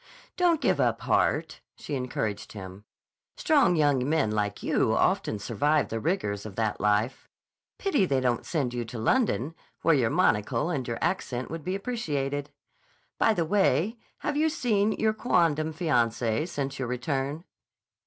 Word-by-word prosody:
"Don't 345 -3 +3
give - - +2
up - - +1
heart," - - +1
she - - -7
encouraged 125 -6 -3
him. 95 0 -9 0.5
"Strong 285 - +3
young 145 -4 +2
men 155 -9 +2
like 105 -1 -2
you - - +2
often 110 - +1
survive 145 +9 +1
the 115 - -2
rigors 105 - -1
of 105 -3 -8
that 110 -1 -1
life. 105 +5 0 0.5
Pity 295 - +1
they 135 -3 +2
don't 125 -2 0
send 140 -7 -2
you 120 -1 -2
to 115 +1 -8
London, 155 - +1 0.3
where 165 - +5
your 125 -6 +2
monocle 105 +13 +1
and 135 -7 -2
your 115 - -2
accent 130 -9 -2
would 165 -1 -5
be 185 +2 -2
appreciated. 145 - -2 0.7
By 225 - +4
the 170 - 0
way, 195 - +2 0.2
have 295 - -1
you 310 +2 +3
seen 220 -9 +1
your 220 0 +1
quondam 165 -9 +1
fiancée 120 -4 0
since 140 -4 -4
your 130 - -2
return?" 135 +5 -2
145 Hz, 155 wpm, -27 LUFS, 115-185 Hz, 0.7 s, where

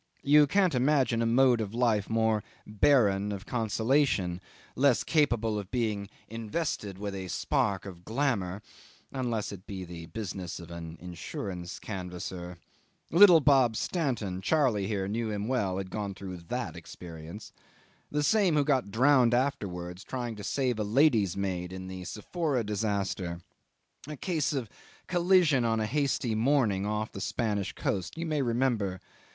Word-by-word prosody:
You 150 +1 +6
can't 185 +1 +3
imagine 130 -3 +2
a 115 - +1
mode 120 0 +4
of 105 +1 -4
life 115 -5 +1
more 110 -2 +2 0.2
barren 105 -3 +3
of 100 0 -6
consolation, 110 -5 +1 0.3
less 135 -1 +3
capable 115 -9 +1
of 100 -2 -8
being 105 -5 -1 0.2
invested 115 - -3
with 100 0 -4
a 95 -1 -5
spark 95 +2 0
of 90 -3 -9
glamour 105 -6 -1 0.5
unless 120 -5 -2
it 95 -2 -10
be 95 -2 -5
the 85 -2 -9
business 90 -2 -5
of 85 -1 -10
an 85 -1 -7
insurance 90 +1 -6
canvasser. 90 -2 -6 0.5
Little 175 -1 +8
Bob 130 -5 +4
Stanton 115 - -2
Charley 120 -6 +2
here 100 -3 -1
knew 110 +2 -2
him 105 0 -3
well 105 -8 0
had 95 -1 -5
gone 100 -2 -3
through 95 -2 -7
that 85 -1 -4
experience. 85 +3 -10 0.6
The 150 0 0
same 195 -2 +3
who 145 - +4
got 135 -7 +1
drowned 125 +1 +4
afterwards 90 -9 -2
trying 120 -3 -4
to 105 - -8
save 125 -3 0
a - - +1
lady's 110 - +3
maid 90 -2 -2
in 95 0 -7
the 95 -1 -7
Sephora 135 - -2
disaster. 100 -4 -2 0.7
A 150 -1 -6
case 160 -1 -1
of 135 -6 -2 0.4
collision 175 -7 +3
on 115 -1 +1
a 110 - 0
hazy 135 -1 0
morning 110 -4 +2
off 105 +1 -2
the 95 - -7
Spanish 105 -4 -1
coast 95 - -3
you 165 - -3
may 155 -3 0
remember. 115 -6 0
110 Hz, 150 wpm, -29 LUFS, 95-135 Hz, 0.7 s, Little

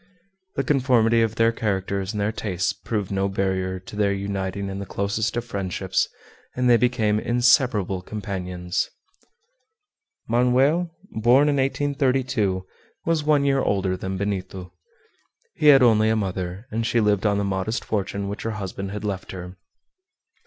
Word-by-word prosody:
The 135 - 0
conformity 125 -5 +3
of 115 -1 0
their 115 0 +3
characters 100 -3 -2
and 105 - -4
their 100 +1 +1
tastes 95 -5 -2
proved 105 -4 -4
no 100 0 0
barrier 95 -1 -1
to 105 +3 -11
their 105 -1 +2
uniting 100 0 -3
in 95 0 -5
the 100 - -5
closest 100 +5 -1
of 120 - -2
friendships, 95 -4 -1 0.5
and 125 0 +1
they 120 - +7
became 115 -3 +2
inseparable 120 -6 +2
companions. 90 -3 -3 1.4
Manoel, 130 +9 +3 0.2
born 125 +6 +4
in 145 - +1
1832, 130 -8 0 0.4
was 165 -2 +1
one 145 -2 +3
year 135 -1 +3
older 95 -2 0
than 95 +1 -4
Benito. 95 -2 -4 0.8
He 150 - +1
had 135 -3 +8
only 110 -2 +5
a 110 - +2
mother, 95 -1 -3
and 115 +2 -1
she 120 +1 +1
lived 105 -1 +2
on 100 -1 +2
the 100 - 0
modest 100 +3 -2
fortune 100 -1 -2
which 100 +1 -5
her 110 -1 -3
husband 95 -1 -5
had 105 +2 -6
left 95 -2 -4
her. 90 0 -8
105 Hz, 150 wpm, -24 LUFS, 95-120 Hz, 1.4 s, had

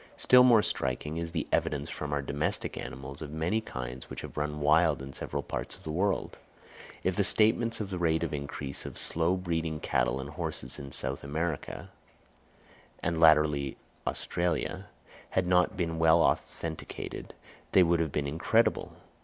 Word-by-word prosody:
Still 125 0 +7
more 120 -4 +6
striking 75 -2 -1
is 85 0 -3
the 80 -3 -2
evidence 75 0 0
from 75 -3 -5
our 70 -1 0
domestic 70 +2 -2
animals 65 +2 -6
of 75 - -5
many 80 +8 0
kinds 65 - -7
which - - -6
have - - -9
run 75 0 -2
wild 80 +3 +4
in 65 0 -8
several - - -4
parts - - -4
of - - -18
the 80 - -4
world; 95 +4 -1 0.6
if 95 - +1
the 100 - +2
statements 115 +3 +3
of 100 -3 -4
the 90 - -3
rate 80 -1 +2
of 85 - -2
increase 70 -1 -4
of - - -8
slow 85 +3 +1
breeding 85 -4 -2
cattle 65 - +1
and 70 +2 -6
horses 80 -1 -4
in 70 -1 -8
South 65 +1 -2
America, 80 +2 -3 1.1
and 85 -1 0
latterly 75 -3 +5
in - - -7 0.3
Australia, 85 -1 -1 0.5
had 95 - +3
not 90 +1 +3
been 85 -3 -1
well 80 0 +5
authenticated, 80 -1 -3 0.4
they 95 - +7
would 85 0 +3
have 80 -3 0
been 75 0 -1
incredible. 75 +3 +1
80 Hz, 170 wpm, -30 LUFS, 70-90 Hz, 1.1 s, Still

